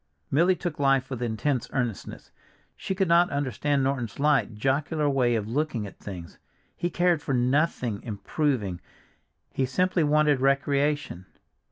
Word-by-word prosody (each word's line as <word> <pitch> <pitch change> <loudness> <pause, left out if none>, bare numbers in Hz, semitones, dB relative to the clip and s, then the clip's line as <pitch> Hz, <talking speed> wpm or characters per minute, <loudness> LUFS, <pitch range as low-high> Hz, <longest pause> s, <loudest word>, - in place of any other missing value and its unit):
Milly 175 +6 +4
took 175 -4 -5
life 135 -1 +2
with 125 -2 -4
intense 125 +2 -1
earnestness. 120 -6 -4 0.4
She 190 - -4
could 190 0 +1
not 170 +1 +4
understand 140 0 0
Norton's 130 -5 -2
light, 145 -6 +2
jocular 145 +6 0
way 125 -4 +2
of 105 -2 -2
looking 125 -3 -1
at 100 - -11
things; 90 -4 -9 0.4
he 175 - -2
cared 175 -3 +2
for 135 - -1
nothing 125 -3 0
"improving," 110 - -2 0.7
he 130 - -1
simply 180 +6 +1
wanted 150 -1 +3
recreation. 140 - 0
140 Hz, 140 wpm, -26 LUFS, 120-150 Hz, 0.7 s, Milly